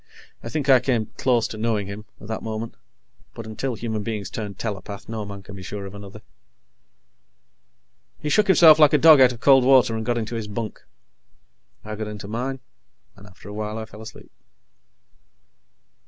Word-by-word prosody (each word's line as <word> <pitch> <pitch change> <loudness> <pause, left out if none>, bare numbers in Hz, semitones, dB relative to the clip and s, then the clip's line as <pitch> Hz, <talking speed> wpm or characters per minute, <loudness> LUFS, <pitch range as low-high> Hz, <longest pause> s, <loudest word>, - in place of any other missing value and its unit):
I 115 - -7
think 145 +1 -3
I 130 -2 +7
came 120 -4 -1
close 120 -3 +2
to 110 - -7
knowing 110 -2 0
him, 100 +2 -8
at - - -12
that 110 +1 -5
moment, 110 +1 -5 0.6
but 115 - -8
until 115 +3 -4
human 110 -1 -4
beings 105 -3 -5
turn 105 -3 -5
telepath, 100 -1 -6
no 110 -2 -5
man 100 -1 -9
can 100 - -11
be 95 - -9
sure 100 +2 -6
of 95 - -9
another. 100 +1 -11 1.9
He - - -6
shook 210 +8 +3
himself 165 -5 +7
like 150 -1 +6
a - - +6
dog 155 -1 +7
out 130 -1 +7
of 120 - -10
cold 135 -2 +6
water, 130 -3 +4
and 110 - -3
got 120 +1 -1
into 115 0 -4
his 115 -2 -4
bunk. 110 +1 -6 1.0
I 110 - -6
got 110 0 -5
into 105 -2 -7
mine, 125 +5 -4 0.5
and 100 +1 -15
after 95 +1 -16
a 105 - -8
while 105 +1 -4
I 110 - -5
fell 110 -1 -13
asleep. 110 - -12
110 Hz, 185 wpm, -23 LUFS, 105-125 Hz, 1.9 s, I